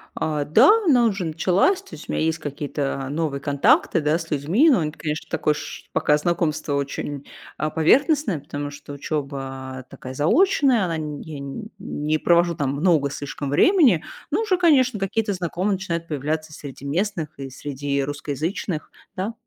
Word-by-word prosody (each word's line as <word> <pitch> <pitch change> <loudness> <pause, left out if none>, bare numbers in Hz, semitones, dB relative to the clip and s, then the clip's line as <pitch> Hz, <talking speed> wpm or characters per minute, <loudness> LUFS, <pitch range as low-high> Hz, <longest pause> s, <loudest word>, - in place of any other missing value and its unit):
А, 150 -2 -1
да, 225 - +6
она 250 -8 +5
уже 200 -5 0
началась. 185 - +2
То 395 - -18
есть - - -12
у - - -1
меня - - 0
есть 160 +1 0
какие-то 140 -2 -3
новые 150 -2 -2
контакты, 145 +4 +3
да, 150 +2 +2
с 165 -1 -8
людьми. 170 - +3
Но 260 - +5
они 155 -2 -1
т - - -19
конечно, 155 -1 -3
такой 155 -1 +1
ш - - -7
Пока 150 - +3
знакомство 155 -2 -1
очень, 140 0 -3 0.3
а, 155 - -1
поверхностное. 245 - +3
Потому 145 +1 -5
что 145 0 -10
учеба 135 -3 -5
такая 130 - -9
заочная, 255 - +3
она 165 -2 -2
н 150 -2 -5
я 155 -3 -8
нь 140 +11 -6
не 155 -4 -1
провожу 170 +1 +3
там 140 -3 -1
много 150 -2 +2
слишком 145 0 -5
времени. 250 - +4 0.3
Но - - +1
уже, 415 -5 +1
конечно, 260 - +4
какие-то 205 +2 -1
знакомые 185 +2 -1
начинают 170 -3 -3
появляться 155 +1 -3
среди 140 -2 -9
местных 170 +2 -1
и 135 -1 -5
среди 140 +1 -3
русскоязычных, 150 +4 -3 0.2
да. 195 +5 -3
155 Hz, 170 wpm, -23 LUFS, 145-195 Hz, 0.3 s, да